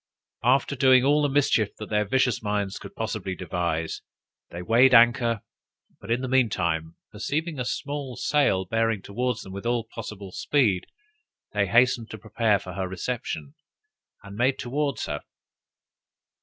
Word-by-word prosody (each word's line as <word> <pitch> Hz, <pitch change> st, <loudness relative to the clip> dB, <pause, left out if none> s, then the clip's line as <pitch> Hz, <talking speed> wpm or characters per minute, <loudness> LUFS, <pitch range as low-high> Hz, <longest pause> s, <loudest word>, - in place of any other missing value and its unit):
After 135 Hz, +3 st, +3 dB
doing 130 Hz, -1 st, +5 dB
all 145 Hz, +2 st, +4 dB
the 145 Hz, -, +2 dB
mischief 135 Hz, -7 st, +2 dB
that 110 Hz, -, -8 dB
their 105 Hz, 0 st, +2 dB
vicious 130 Hz, +3 st, +1 dB
minds 105 Hz, -2 st, -2 dB
could 100 Hz, -, -11 dB
possibly 105 Hz, -4 st, -3 dB
devise, 85 Hz, -3 st, -2 dB, 0.5 s
they 90 Hz, +1 st, -7 dB
weighed 125 Hz, +6 st, +5 dB
anchor; 120 Hz, -2 st, +4 dB, 0.6 s
but -, -, -12 dB
in 120 Hz, +2 st, +1 dB
the 130 Hz, -, -3 dB
mean 130 Hz, -2 st, +3 dB
time, 80 Hz, -4 st, -2 dB, 0.2 s
perceiving 145 Hz, +9 st, -3 dB
a -, -, 0 dB
sail 135 Hz, -7 st, 0 dB
bearing 115 Hz, 0 st, 0 dB
towards 125 Hz, +3 st, -2 dB
them 95 Hz, -, -10 dB
with 100 Hz, +4 st, -5 dB
all 120 Hz, -1 st, +1 dB
possible 105 Hz, -4 st, -8 dB
speed, 105 Hz, -7 st, +1 dB, 0.7 s
they 100 Hz, -1 st, +1 dB
hastened 120 Hz, +1 st, +3 dB
to 110 Hz, -, -7 dB
prepare 110 Hz, 0 st, +1 dB
for 90 Hz, -1 st, -9 dB
her 95 Hz, 0 st, -3 dB
reception, 90 Hz, -, -4 dB, 0.7 s
and 100 Hz, 0 st, -10 dB
made 130 Hz, +4 st, +2 dB
towards 140 Hz, -1 st, -2 dB
her. 75 Hz, -, -4 dB
115 Hz, 150 wpm, -25 LUFS, 100-130 Hz, 0.7 s, doing